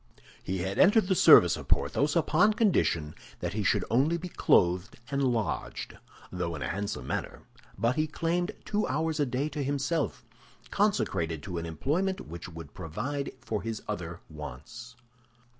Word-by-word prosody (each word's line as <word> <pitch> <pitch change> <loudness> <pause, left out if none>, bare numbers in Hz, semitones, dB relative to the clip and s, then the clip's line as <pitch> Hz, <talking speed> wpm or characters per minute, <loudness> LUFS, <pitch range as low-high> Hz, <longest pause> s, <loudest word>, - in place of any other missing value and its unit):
He 95 - -3
had 95 +1 -3
entered 205 +2 +6
the 190 - +3
service 90 - +7
of - - -9
Porthos 145 +1 +1
upon 175 +5 +4
condition 85 - +1 0.3
that 90 0 -3
he 110 - -1
should - - +2
only 140 +8 +3
be 180 +2 -6
clothed 90 - +2 0.2
and 140 0 0
lodged, 120 -4 -2 0.4
though 90 -2 -3
in 75 - -5
a - - -2
handsome 100 +2 -3
manner; - - -4 0.3
but 115 +7 +1
he 155 0 +2
claimed 170 +4 -1
two 210 0 0
hours 160 +1 -1
a 145 - +2
day 130 +4 -1
to 150 -2 -3
himself, 145 +3 -1 0.5
consecrated 80 -2 0
to 90 -3 -4
an 85 - -5
employment 165 - -1
which 85 +3 -8
would 80 -4 -10
provide 130 - -4
for 110 -2 -3
his 115 -2 -5
other 85 -5 -5
wants. 75 - -9
120 Hz, 160 wpm, -29 LUFS, -, 0.5 s, service